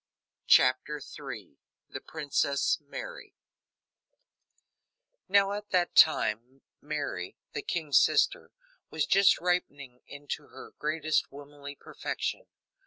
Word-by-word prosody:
CHAPTER 130 +4 +4
III 120 - -9 0.3
The - - -7
Princess 140 -2 0
Mary 155 - -9 1.9
Now, 200 0 +4
at 205 0 -5
that 180 -1 +1
time, 130 -3 +3 0.2
Mary, 150 0 -4 0.2
the 445 - -3
king's 435 +1 +2
sister, - - +1 0.4
was - - -1
just 195 0 +5
ripening 145 -8 -2
into 145 0 -7
her - - -12
greatest 155 +1 0
womanly 145 0 -10
perfection. - - -5
145 Hz, 100 wpm, -29 LUFS, 140-180 Hz, 1.9 s, just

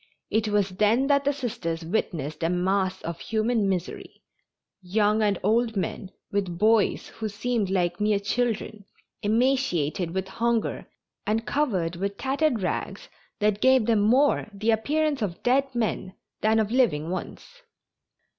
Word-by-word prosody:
It 220 0 +1
was 205 -2 +1
then 215 +7 +2
that 280 0 +2
the 285 - +3
Sisters 215 - -4
witnessed 160 -5 -2
a 165 - +1
mass 185 +2 0
of 170 0 -5
human 220 -2 0
misery 185 -2 -4 0.6
young 210 +3 +1
and 205 -3 +2
old 225 +1 +2
men, 185 +1 -3 0.2
with 190 -4 -1
boys 215 +2 +2
who 220 -1 -5
seemed 215 0 -1
like 180 -1 0
mere 210 0 +3
children, 215 -1 -2 0.4
emaciated 210 - +1
with 190 0 -2
hunger 230 +2 -1 0.4
and 220 +2 0
covered 190 - 0
with 200 +2 -3
tattered 270 -4 0
rags - - -3 0.3
that 210 0 +1
gave 260 -3 +5
them 225 -2 +3
more 250 +5 +3
the 215 +3 +1
appearance 290 +5 0
of 180 -5 -3
dead 270 +3 +3
men 215 -5 -2 0.3
than 220 +1 +3
of 215 -1 +1
living 175 - +2
ones. - - -7
215 Hz, 145 wpm, -26 LUFS, 190-240 Hz, 0.6 s, gave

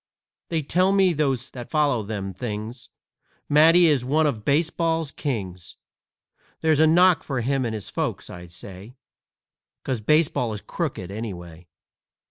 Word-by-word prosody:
They 160 -2 -1
tell 180 +6 +2
me, 195 -2 +3
those 140 -5 -1
that 120 -2 -9
follows 140 -9 +1
them 100 -3 -4
things, 110 +3 -6 0.6
Matty 165 +4 +6
is 145 -6 +3
one 150 +5 +2
of 115 -8 -1
baseball's 165 +2 0
kings. 95 - -5 0.9
That's 160 -2 +2
a 160 - +6
knock 175 +2 +5
for 135 -4 -3
him 135 +2 0
and 110 -2 -3
his 105 - -8
folks, - - -3
I 90 -1 -10
say, 95 +6 -11 0.9
'Cause 130 -5 -3
baseball 140 -3 +1
is 105 - -6
crooked, 95 0 -4
anyway!" 90 -6 -8
130 Hz, 140 wpm, -24 LUFS, 105-155 Hz, 0.9 s, Matty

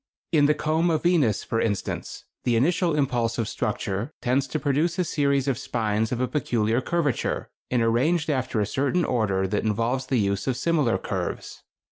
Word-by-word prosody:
In 145 -3 +4
the 150 - +3
comb 160 +3 +1
of 160 -2 0
Venus, 155 - +2
for 115 - -1
instance, 100 -4 -3 0.2
the 120 - +2
initial 170 - +2
impulse 120 -5 0
of 115 -3 -1
structure 100 +9 -2
tends 130 +2 +1
to 130 - -2
produce 155 +5 0
a 180 - +2
series 140 -4 +1
of 130 -4 0
spines 110 -1 -1
of 125 - -1
a 130 - +1
peculiar 120 -3 0
curvature, 155 -3 -1 0.2
and 125 -2 +2
arranged 150 +8 +2
after 130 -6 -1
a 105 - +2
certain 140 - 0
order 100 -6 +1
that 105 +2 -1
involves 115 +5 0
the 130 - +1
use 100 -1 0
of 130 -2 0
similar 150 -5 +1
curves. - - -4
130 Hz, 180 wpm, -25 LUFS, 115-150 Hz, 0.2 s, In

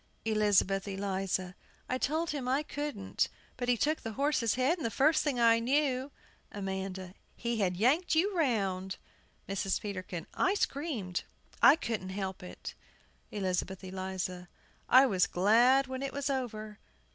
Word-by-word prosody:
ELIZABETH 205 -3 +2
ELIZA. 190 -2 -2 0.3
I 255 - -1
told 315 +5 0
him 280 -4 -4
I 270 +4 +1
couldn't; 290 -10 -2 0.3
but 245 -1 -3
he 245 - +3
took 310 +6 +1
the 225 - -5
horse's 270 -4 +1
head, 265 +8 +1
and - - -5
the 230 - 0
first 305 +7 +3
thing 280 -5 0
I 230 -1 +5
knew 265 +2 +1 0.4
AMANDA. 190 -2 -5 0.2
He 235 -1 -2
had 180 -3 +1
yanked 295 - +3
you 380 +5 +2
round! 195 - 0 0.5
MRS. 195 0 -1
PETERKIN. 185 -5 -5
I 390 - +2
screamed; 270 - -2 0.4
I - - +9
couldn't 225 - -3
help 190 -1 -4
it! 180 - -8 0.6
ELIZABETH 190 -1 -2
ELIZA. 185 -1 -4 0.4
I 260 +2 +8
was 190 -8 +2
glad 240 +8 +4
when 260 0 -5
it 275 -1 -3
was 280 0 -1
over! 215 -5 -4
225 Hz, 145 wpm, -31 LUFS, 190-275 Hz, 0.6 s, I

